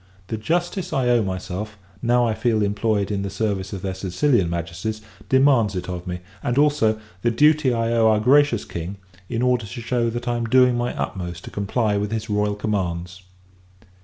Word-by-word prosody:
The 110 - -2
justice 175 - -1
I 130 -4 +1
owe 120 -1 +4
myself, 95 +2 -4 0.2
now 120 0 +3
I 115 - +1
feel 110 -1 +1
employed 105 0 0
in 100 -1 -1
the 100 - -3
service 100 -1 -2
of 95 -3 -6
their 95 -1 -2
Sicilian 95 - +1
Majesties, 85 +6 -4 0.3
demands 130 -7 +4
it 90 - -4
of 90 -1 -5
me; 90 0 -4 0.2
and, 120 - -1
also, 145 -7 +3 0.2
the 120 - +2
duty 150 +2 +4
I 115 -1 0
owe 115 -1 +4
our 110 -1 +4
gracious 135 0 +4
King, 85 +4 -6 0.3
in 115 0 -1
order 125 -3 +1
to 100 - -7
shew 120 0 0
that 120 +1 -5
I 120 0 0
am 120 - -2
doing 125 +1 +4
my 120 0 -2
utmost 85 +4 -4
to - - -9
comply 105 +1 0
with 105 +1 -2
his 110 -1 -3
royal 105 0 +1
commands. 95 -3 -3
110 Hz, 190 wpm, -22 LUFS, 100-120 Hz, 0.3 s, owe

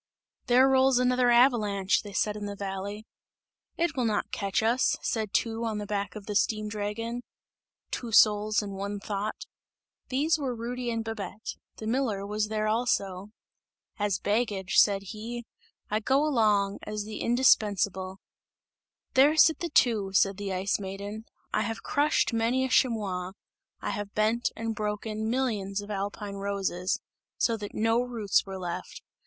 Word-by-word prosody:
"There 255 +2 +6
rolls 265 -1 +4
another 250 0 +3
avalanche!" 220 -6 +3
they 205 - -9
said 210 +1 0
in 205 -1 -5
the 200 - -5
valley. 200 +2 -5 0.7
"It 335 -2 0
will 250 -3 0
not 215 -2 -1
catch 200 +2 -1
us!" 235 +3 +2
said 220 -3 -1
two 230 0 0
on 220 -2 -1
the 210 - -4
back 200 -2 -3
of 210 -2 -8
the 210 - -4
steam 215 +1 +1
dragon; 220 +3 -3 0.7
"two 235 -2 -4
souls 210 0 +5
and 200 -1 -6
one 200 +1 -4
thought" 205 +1 -4 0.6
these 305 +5 +2
were 260 -4 -2
Rudy 240 +2 -4
and 230 -1 -1
Babette; 215 -2 -5 0.2
the 220 - -8
miller 220 -4 0
was 210 +1 -1
there 215 0 -1
also. 200 -4 0 0.7
"As 205 -2 +1
baggage," 205 -3 -1
said 200 -2 +5
he, 235 +2 -6 0.5
"I 215 - +2
go 265 +6 +2
along, 210 -8 +2
as 210 0 -4
the 215 +1 -6
indispensable!" 205 -6 +2 1.0
"There 280 +4 +6
sit 320 0 +6
the 340 - -3
two," 215 -9 +2
said 195 0 +3
the 200 -1 -4
Ice 190 +2 0
Maiden, 200 +3 -6 0.3
"I - - +2
have 225 -1 -3
crushed 290 -3 +2
many 235 +3 +1
a - - -3
chamois; 195 -8 +1 0.5
I - - -2
have 205 0 -5
bent 220 +3 +2
and 225 0 -3
broken 215 +1 -3
millions 215 -6 -1
of 205 +1 -7
alpine 200 0 -4
roses, 195 -2 -1 0.4
so 230 - +2
that 205 -1 -7
no 225 +2 +2
roots 230 -6 0
were 190 0 -5
left! 175 -2 -6
215 Hz, 160 wpm, -28 LUFS, 200-235 Hz, 1.0 s, There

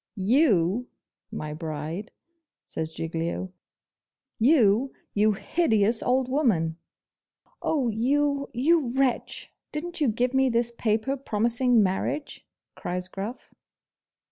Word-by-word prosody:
'YOU 215 - +2 0.4
my 150 0 -5
bride!' 160 +5 -5 0.5
says 160 0 -4
Giglio. 165 +3 -3 0.9
'You, 240 -1 +4 0.2
you 210 +1 +3
hideous 220 - +1
old 255 0 +1
woman!' 210 - +1 0.8
'Oh, 280 -6 +1
you 280 +5 +1
you 265 0 +2
wretch! 270 -2 -1 0.2
didn't 340 +3 -5
you 290 - +4
give 245 +3 0
me 265 0 +3
this 235 0 +1
paper 225 +3 0
promising 235 -1 +2
marriage?' 195 +10 -2 0.3
cries 180 +1 -4
Gruff. 200 +6 -7
230 Hz, 100 wpm, -26 LUFS, 190-265 Hz, 0.9 s, You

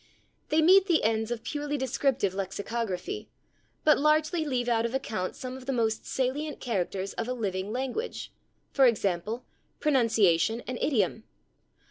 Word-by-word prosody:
They 315 +1 +3
meet 380 +3 +6
the 340 -4 +3
ends 220 0 +1
of 240 -2 -3
[Pg034] - - -33
purely 295 0 -3
descriptive 260 -6 0
lexicography, 200 - -4 0.5
but 305 - +5
largely 310 +3 +2
leave 255 -5 -1
out 230 -1 +2
of 235 +2 -2
account 215 -8 -3
some 255 0 -6
of 260 0 -11
the - - +1
most 225 -3 0
salient 280 +4 -2
characters 195 -4 -2
of 230 - -3
a 250 - -1
living 200 -4 -3
language, 265 - -3 0.4
for 270 -2 +5
example, 215 +1 -1 0.3
pronunciation 225 - +3
and 250 0 -4
idiom. 220 - +1
240 Hz, 150 wpm, -28 LUFS, 215-285 Hz, 0.5 s, meet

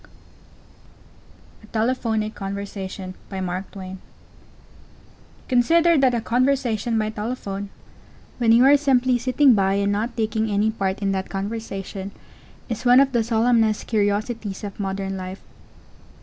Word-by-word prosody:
A 215 - -16
TELEPHONIC 220 -1 -1
CONVERSATION 195 -1 -6 2.3
Consider 330 +7 +4
that 260 -2 +3
a 235 - -1
conversation 245 -2 +1
by 215 0 0
telephone 210 -3 -5 0.7
when 230 -2 +3
you 235 +3 +6
are 285 +1 +7
simply 255 -3 +2
sitting 255 +2 +4
by 195 -2 +2
and 200 0 +1
not 225 +4 -2
taking 220 0 0
any 210 +1 +1
part 195 -2 -2
in 195 - +1
that 190 0 -3
conversation 195 -1 -5 0.6
is 230 -1 -4
one 250 +1 +6
of 275 0 +4
the 235 -3 +1
solemnest 225 -1 +2
curiosities 210 -1 -1
of 200 0 -7
modern 195 -1 -3
life. 185 +1 -7
220 Hz, 120 wpm, -23 LUFS, 200-245 Hz, 2.3 s, are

